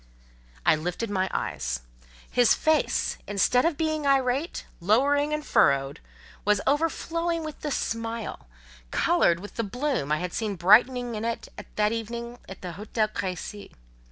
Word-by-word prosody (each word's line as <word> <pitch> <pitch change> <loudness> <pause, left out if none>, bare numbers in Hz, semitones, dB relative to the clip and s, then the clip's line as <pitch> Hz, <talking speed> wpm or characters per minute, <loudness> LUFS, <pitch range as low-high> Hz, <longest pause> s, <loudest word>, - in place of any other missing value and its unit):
I - - +6
lifted 180 +8 -3
my 190 -1 0
eyes: 60 0 -2 0.5
his 245 -2 +4
face, 315 0 +1
instead 205 +6 +3
of 335 -3 +1
being 310 -2 0
irate, 270 +3 +1
lowering, 280 - +3
and 300 0 -2
furrowed, 140 +2 +3 0.4
was 210 -1 +3
overflowing 330 +2 0
with 310 -1 -7
the 300 - -2
smile, 230 - -3 0.4
coloured 170 - +3
with 205 +3 -10
the 230 - 0
bloom 245 - -2
I 150 - +3
had 180 +2 -4
seen 215 -3 -2
brightening 240 +7 +4
it 225 +2 -3 0.3
that 210 0 +2
evening 235 +1 -5
at 190 - -10
the 180 - -4
Hotel 215 +4 -1
Crécy. 200 +1 -5
230 Hz, 140 wpm, -26 LUFS, 190-280 Hz, 0.5 s, I